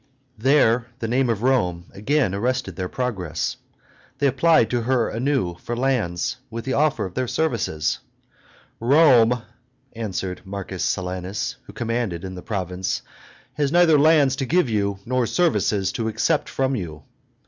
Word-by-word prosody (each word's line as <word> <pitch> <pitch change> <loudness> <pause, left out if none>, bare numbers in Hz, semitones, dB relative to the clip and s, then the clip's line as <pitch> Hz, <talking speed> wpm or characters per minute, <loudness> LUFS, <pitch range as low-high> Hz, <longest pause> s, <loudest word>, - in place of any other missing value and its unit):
There 125 -2 +3
the 115 - -3
name 125 +2 +1
of 115 -1 -1
Rome 90 -10 +1
again 120 0 0
arrested 120 -2 -1
their 90 +1 -4
progress; 110 - -3 0.6
they - - 0
applied 140 -1 +4
to 120 -1 +1
her 125 0 +1
anew 120 -8 -1
for 120 - -4
lands, 115 -10 0
with 115 0 -6
the 130 - -1
offer 150 -5 +1
of 95 - -7
their 130 +5 -1
services. 115 - -1 0.8
"Rome," 125 -3 +5 0.5
answered 95 -5 -4
M. 95 -2 -5
Silanus, 95 - -2
who - - -11
commanded 115 -8 -2
in 95 -1 -6
the 90 - -8
province, 95 -3 -3 0.5
"has 145 -2 0
neither 170 -3 +5
lands 145 -3 +5
to 135 - -1
give 170 -6 +2
you 100 -2 0
nor 125 -1 0
services 105 - +1
to 115 -2 -2
accept 110 - 0
from 135 0 0
you." 80 - -6
115 Hz, 150 wpm, -23 LUFS, 95-135 Hz, 0.8 s, Rome